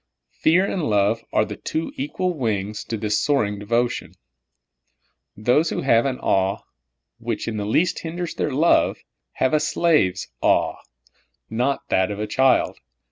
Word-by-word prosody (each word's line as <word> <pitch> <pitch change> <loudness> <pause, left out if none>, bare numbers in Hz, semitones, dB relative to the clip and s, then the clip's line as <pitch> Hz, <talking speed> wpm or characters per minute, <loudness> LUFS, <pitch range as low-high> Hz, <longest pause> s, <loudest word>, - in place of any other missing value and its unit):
Fear 175 +5 +4
and 180 - -2
love 105 +2 +2
are 110 - +2
the - - -7
two 160 +10 -3
equal 215 -11 -2
wings 105 -6 -2
to 115 - -3
this 105 0 0
soaring 105 -9 0
devotion. 120 +4 -1 1.2
Those 125 +9 +2
who - - -2
have 120 -1 +3
an 130 -2 -2
awe 95 +1 +1 0.6
which 115 -1 -3
in 110 -2 -3
the 105 -1 -3
least 170 +11 +1
hinders 170 +1 -5
their - - -1
love, 155 +6 +3 0.4
have 130 - 0
a 155 - +4
slave's 150 - +1
aw^e, - - +2 0.8
and - - -6
not 140 +3 +1
that 95 +1 +2
of 105 0 -5
a 105 - -1
child. 130 +4 +2
120 Hz, 155 wpm, -22 LUFS, 105-155 Hz, 1.2 s, Fear